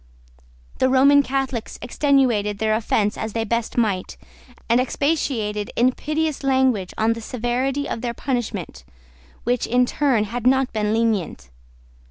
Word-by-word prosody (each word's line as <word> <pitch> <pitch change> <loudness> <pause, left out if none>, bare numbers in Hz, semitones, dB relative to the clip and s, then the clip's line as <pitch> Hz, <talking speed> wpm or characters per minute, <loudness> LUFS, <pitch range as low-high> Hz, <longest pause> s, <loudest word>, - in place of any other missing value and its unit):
The 260 - +3
Roman 280 +2 +6
Catholics 270 -4 -3
extenuated 245 -6 +1
their 215 +1 +1
offense 215 -1 0
as 220 -1 -4
they 225 - -1
best 230 +2 -2
might, 205 -6 0 0.5
and 235 +2 +3
expatiated 255 -8 -1
in 250 +2 +3
piteous 305 +2 -2
language 260 -8 +1
on 220 +1 +2
the 230 - -8
severity 250 +5 -2
of 225 - -4
their 235 -1 -3
punishment, 220 - -4 0.6
which, 245 0 0
in 250 +2 +3
truth, 250 -5 +1
had 240 +3 -3
not 265 0 +2
been 210 -1 0
lenient. 210 - -1
240 Hz, 140 wpm, -22 LUFS, 215-265 Hz, 0.6 s, Roman